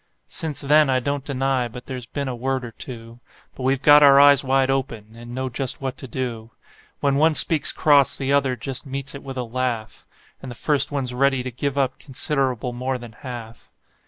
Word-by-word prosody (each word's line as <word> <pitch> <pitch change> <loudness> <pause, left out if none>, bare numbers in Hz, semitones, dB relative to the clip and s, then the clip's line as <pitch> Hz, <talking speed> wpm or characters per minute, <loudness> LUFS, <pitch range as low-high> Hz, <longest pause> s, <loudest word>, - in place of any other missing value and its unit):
Since 155 -5 -2
then 150 0 +4
I 130 -1 +2
don't 140 +1 -3
deny 135 -2 -1
but 125 +2 -11
there's 125 -2 -7
been 140 -1 -4
a 130 - -3
word 130 +1 -2
or 115 - -8
two; 115 0 -10 0.3
But - - -11
we've 130 +1 0
got 145 +1 +8
our 140 -1 +7
eyes 145 -1 +6
wide 135 0 +2
open, 115 -5 -4
and 120 +1 -10
know 130 0 -2
just 130 +1 -3
what 135 -2 -4
to 135 - -9
do: 115 -2 -5 0.5
When 140 -1 +2
one 155 +1 +3
speaks 155 -2 +3
cross 145 -3 +3
the 135 0 -1
other 135 -2 +2
just 130 +2 -5
meets 135 0 -6
it 140 - -8
with 135 -1 -8
a 125 - -1
laugh, 120 -2 -4 0.3
And 135 - -8
the 120 - -8
first 145 +4 +2
one's 135 -3 -2
ready 135 0 +1
to 130 - -5
give 140 +3 -3
up 135 -2 0
considerable 130 -3 -2
more 130 +2 -2
than 120 -2 -11
half. 115 -1 -10
130 Hz, 210 wpm, -22 LUFS, 125-140 Hz, 0.5 s, got